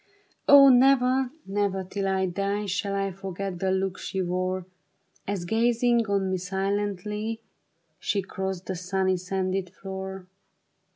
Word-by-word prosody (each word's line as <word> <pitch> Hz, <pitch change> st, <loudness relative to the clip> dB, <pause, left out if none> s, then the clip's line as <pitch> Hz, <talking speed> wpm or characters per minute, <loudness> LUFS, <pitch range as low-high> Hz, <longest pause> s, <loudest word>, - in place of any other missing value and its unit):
O 280 Hz, -1 st, +10 dB
never, 260 Hz, 0 st, +4 dB, 0.2 s
never 195 Hz, -1 st, -1 dB
till 195 Hz, +1 st, -3 dB
I 190 Hz, 0 st, +1 dB
die 200 Hz, +3 st, -1 dB
Shall 200 Hz, +1 st, -1 dB
I 195 Hz, 0 st, -1 dB
forget 190 Hz, 0 st, -5 dB
the 190 Hz, -, 0 dB
look 190 Hz, 0 st, -1 dB
she 190 Hz, -, -4 dB
wore. 185 Hz, 0 st, -1 dB, 0.6 s
As 195 Hz, -3 st, -2 dB
gazing 235 Hz, +2 st, +2 dB
on 195 Hz, -1 st, 0 dB
me 185 Hz, -, +1 dB
silently 205 Hz, +3 st, -2 dB, 0.6 s
She 200 Hz, -2 st, -1 dB
crossed 190 Hz, -1 st, -4 dB
the 190 Hz, -, -3 dB
sunny, 185 Hz, +1 st, 0 dB
sanded 185 Hz, 0 st, -2 dB
floor. 190 Hz, 0 st, -7 dB
195 Hz, 130 wpm, -26 LUFS, 185-205 Hz, 0.6 s, O